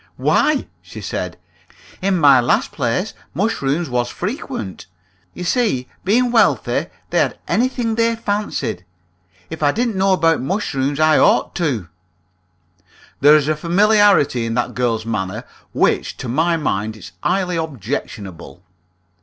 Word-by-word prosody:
"Why," 300 Hz, -3 st, +2 dB, 0.2 s
she -, -, -11 dB
said, -, -, -4 dB, 0.6 s
"in 190 Hz, 0 st, +1 dB
my 140 Hz, -5 st, +6 dB
last 120 Hz, -, +1 dB
place -, -, -1 dB, 0.2 s
mushrooms 170 Hz, -5 st, 0 dB
was 120 Hz, -1 st, -1 dB
frequent. 110 Hz, -, -5 dB, 0.5 s
You 180 Hz, -, -6 dB
see, 175 Hz, -, 0 dB, 0.2 s
being 240 Hz, +5 st, +2 dB
wealthy, 230 Hz, -2 st, +2 dB, 0.2 s
they -, -, +2 dB
had -, -, 0 dB
anything 245 Hz, -2 st, 0 dB
they 230 Hz, +1 st, +1 dB
fancied. 205 Hz, -, -3 dB, 0.7 s
If 160 Hz, 0 st, -6 dB
I 145 Hz, -1 st, +4 dB
didn't 235 Hz, +2 st, -1 dB
know 190 Hz, 0 st, +3 dB
about 165 Hz, -4 st, +2 dB
mushrooms, 140 Hz, -4 st, -1 dB
I 155 Hz, 0 st, +4 dB
ought -, -, +3 dB
to!" 135 Hz, -, -1 dB, 1.3 s
There 145 Hz, +2 st, +7 dB
is 150 Hz, -2 st, +2 dB
a 155 Hz, -, +1 dB
familiarity 180 Hz, -, +3 dB
in 115 Hz, -, -2 dB
that 125 Hz, -, -1 dB
girl's 115 Hz, -3 st, -1 dB
manner 110 Hz, 0 st, -3 dB, 0.3 s
which -, -, 0 dB
to -, -, -6 dB
my 165 Hz, +7 st, +1 dB
mind 110 Hz, -7 st, -2 dB
is -, -, -11 dB
highly 180 Hz, 0 st, 0 dB
objectionable. 105 Hz, -, -6 dB
155 Hz, 135 wpm, -19 LUFS, 120-200 Hz, 1.3 s, There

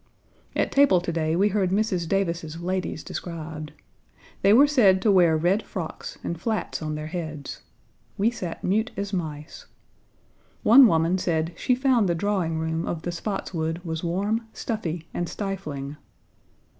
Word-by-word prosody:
At -, -, +1 dB
table 275 Hz, -10 st, +5 dB
to 175 Hz, 0 st, -3 dB
day 160 Hz, -1 st, 0 dB
we 200 Hz, +4 st, +3 dB
heard 195 Hz, -2 st, +1 dB
Mrs. 190 Hz, -3 st, 0 dB
Davis's 170 Hz, -4 st, -1 dB
ladies 185 Hz, -2 st, -3 dB
described. 160 Hz, -3 st, -6 dB, 0.7 s
They 195 Hz, -, +5 dB
were 255 Hz, +7 st, +8 dB
said 230 Hz, -11 st, +4 dB
to 215 Hz, -, +4 dB
wear 175 Hz, -4 st, +5 dB
red 180 Hz, +7 st, +2 dB
frocks 180 Hz, -7 st, -6 dB
and 170 Hz, -1 st, -4 dB
flats 220 Hz, -6 st, -2 dB
on 155 Hz, -1 st, -3 dB
their 150 Hz, 0 st, -5 dB
heads. 155 Hz, -4 st, -6 dB, 0.6 s
We 215 Hz, +4 st, +2 dB
sat 180 Hz, -8 st, -6 dB
mute 220 Hz, +5 st, +1 dB
as 200 Hz, 0 st, -3 dB
mice. 155 Hz, -4 st, -5 dB, 1.0 s
One 255 Hz, +3 st, +9 dB
woman 165 Hz, 0 st, +2 dB
said 165 Hz, -1 st, -1 dB
she 250 Hz, -, +1 dB
found 250 Hz, -6 st, +2 dB
the 170 Hz, -, +2 dB
drawing 175 Hz, -3 st, 0 dB
room 160 Hz, +1 st, -2 dB
of 165 Hz, -2 st, -3 dB
the 175 Hz, -, -2 dB
Spotswood 170 Hz, -3 st, -3 dB
was 160 Hz, -1 st, -4 dB
warm, 205 Hz, +7 st, -1 dB
stuffy, 170 Hz, -7 st, -4 dB
and 175 Hz, -, -2 dB
stifling. 150 Hz, -8 st, -5 dB
175 Hz, 155 wpm, -25 LUFS, 160-205 Hz, 1.0 s, One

